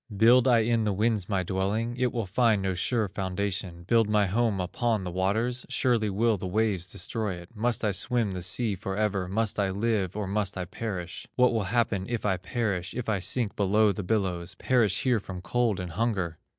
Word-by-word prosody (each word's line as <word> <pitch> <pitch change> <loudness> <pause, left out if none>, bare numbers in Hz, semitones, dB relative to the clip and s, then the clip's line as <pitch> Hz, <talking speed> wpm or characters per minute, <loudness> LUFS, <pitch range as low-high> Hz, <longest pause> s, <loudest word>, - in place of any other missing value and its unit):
Build 120 +4 +6
I 120 -3 +5
in 115 0 +1
the 105 -2 +1
winds 105 -1 0
my 95 -3 +1
dwelling? 100 +6 -1
It 125 -1 0
will 115 -3 -2
find 105 +1 +2
no 95 -1 0
sure 110 +4 0
foundation. 95 -2 -3
Build 115 +3 +3
my 105 -1 +3
home 105 +1 +1
upon 110 +3 -1
the 90 - -4
waters? 110 +7 0
Surely 120 -5 +1
will 110 +2 +2
the 95 0 -5
waves 95 -2 0
destroy 110 -5 -2
it. 85 +6 -13
Must 115 +1 0
I 105 - +2
swim 110 +2 0
the 90 -1 -4
sea 105 +5 +1
forever, 100 -1 -2
Must 105 +2 -1
I 100 -1 +2
live, 100 -1 -1
or 105 - -2
must 100 0 -2
I 90 - -2
perish? 90 -3 -5
What 125 -1 +4
will 110 -4 0
happen 100 -2 0
if 120 -3 -2
I 95 -3 +2
perish, 95 -2 -2
If 120 -2 -3
I 105 -3 +1
sink 110 +3 0
below 105 +1 +3
the 100 - -4
billows, 95 -3 -1
Perish 120 -6 +2
here 125 -4 +2
from 95 -2 -7
cold 115 +2 0
and 90 -2 -5
hunger?" 95 -5 -1
105 Hz, 205 wpm, -27 LUFS, 95-115 Hz, -, Build